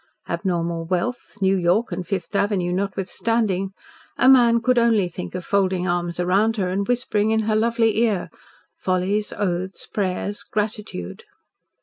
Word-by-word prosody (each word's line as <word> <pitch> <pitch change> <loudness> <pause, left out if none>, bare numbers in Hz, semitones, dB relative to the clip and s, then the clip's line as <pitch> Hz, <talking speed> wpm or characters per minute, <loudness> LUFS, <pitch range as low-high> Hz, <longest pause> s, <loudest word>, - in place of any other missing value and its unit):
abnormal 170 -1 -1
wealth, 200 +7 -3
New 190 +1 +4
York 185 +6 +1
and 175 0 -4
Fifth 195 +1 -3
Avenue 195 -3 +1
notwithstanding, 195 +1 -1 0.5
a 255 - +4
man 240 -3 +6
could 250 +1 +2
only 225 -5 +3
think 90 - -7
of 180 - -5
folding 190 -2 +1
arms 175 -1 -1
round 200 +6 +2
her 185 -3 0
and 195 +2 -1
whispering 220 -4 +1
in 220 0 +2
her 215 0 0
lovely 225 -1 +2
ear 215 -6 +1 0.4
follies, 190 +3 0
oaths, 185 -1 -3
prayers, 200 +1 -2
gratitude. 205 - -4
195 Hz, 140 wpm, -22 LUFS, 180-220 Hz, 0.5 s, man